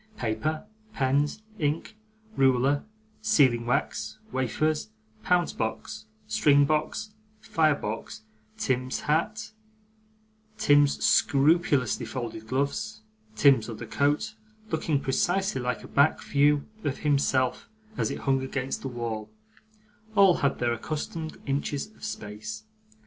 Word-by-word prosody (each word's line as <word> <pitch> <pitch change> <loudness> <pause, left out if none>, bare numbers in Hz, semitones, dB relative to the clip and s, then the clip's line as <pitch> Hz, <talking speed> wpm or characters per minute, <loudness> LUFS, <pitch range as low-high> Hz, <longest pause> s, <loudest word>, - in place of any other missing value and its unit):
Paper, 155 - -2 0.3
pens, 140 +9 +1 0.2
ink, 155 +7 -1 0.4
ruler, 135 +2 +3 0.4
sealing 135 - +3
wax, 125 - -1
wafers, 150 +2 0 0.3
pounce 175 +7 +2
box, 110 -1 -4 0.2
string 145 +5 +4
box, 155 +8 -1 0.3
fire 165 -9 +2
box, 110 -2 -6 0.3
Tim's 130 0 -1
hat, 170 +10 -1 1.1
Tim's 145 -8 +4
scrupulously 140 -4 +3
folded 110 -2 -5
gloves, 140 - -2 0.3
Tim's 130 -6 +4
other 115 0 -6
coat 145 - 0 0.4
looking 155 -2 +1
precisely 175 +3 0
like 125 0 -2
a - - -9
back 140 +3 +3
view 145 0 +2 0.2
of 145 -1 -1
himself 135 -3 +1 0.3
as - - 0
it - - -5
hung 135 -1 +1
against 130 0 -3
the - - -4
wall 115 -4 -4 0.9
all 195 -3 +6
had 140 - +1
their 120 -1 +1
accustomed 155 +5 -5
inches 140 0 -1
of - - -20
space. 110 - -6
140 Hz, 110 wpm, -27 LUFS, 125-155 Hz, 1.1 s, all